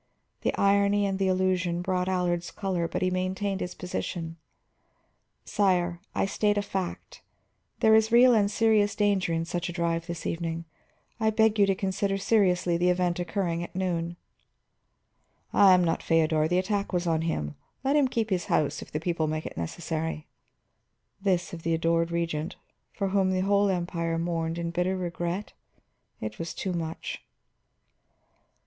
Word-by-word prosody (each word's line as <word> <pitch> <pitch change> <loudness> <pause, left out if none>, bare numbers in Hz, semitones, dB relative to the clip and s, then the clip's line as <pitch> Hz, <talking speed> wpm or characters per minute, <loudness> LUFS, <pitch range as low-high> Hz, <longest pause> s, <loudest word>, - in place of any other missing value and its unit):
The - - 0
irony 200 +1 +3
and 195 -1 -1
the 195 - +2
allusion 185 -2 +1
brought 185 0 0
Allard's 175 -2 0
color, 185 -4 -2
but 165 - -2
he 185 - +1
maintained 190 +2 -1
his 180 - -4
position. 170 -2 -4 1.1
"Sire, 180 -4 +1 0.2
I - - +2
state 205 +1 +1
a 205 - +1
fact. 190 -3 -5 0.6
There 220 - +6
is 220 0 +4
real 245 +1 +7
and 205 -3 +3
serious 215 -1 +3
danger 200 -4 +1
in 165 0 0
such 175 +1 -3
a - - -3
drive 170 -1 -1
this 170 -1 -5
evening. 165 0 -3 0.5
I 220 -1 +3
beg 220 0 +3
you 200 - +6
to 195 - +2
consider 195 +1 -1
seriously 185 -4 +2
the 180 +1 +2
event 180 -1 +1
occurring 175 -1 -1
at 175 - -9
noon." 175 -2 -2 1.4
"I 200 -2 +7
am 180 - +3
not 165 -1 0
Feodor; 160 -1 +2
the 175 +2 +1
attack 200 +2 -1
was 180 -1 0
on 165 -2 +1
him. 75 - -2 0.3
Let 275 +2 +2
him 290 -3 +4
keep 225 -4 -2
his 180 -2 0
house 145 -1 0
if - - -11
the 150 - -2
people 165 -1 -1
make 155 0 -3
it - - -6
necessary." 160 - -3 1.0
This 185 -3 0
of 165 - -6
the 165 0 +1
adored 165 +1 +1
Regent, 170 0 -2 0.4
for 195 -1 -2
whom 190 -1 +2
the 185 0 +1
whole 200 +1 +3
Empire 170 -2 -1
mourned 165 -1 -2
in 170 0 -3
bitter 180 +2 0
regret! 175 +2 -3 0.7
It 110 0 -6
was 165 0 -5
too 190 - -3
much. 165 -2 -5
180 Hz, 165 wpm, -27 LUFS, 170-195 Hz, 1.4 s, real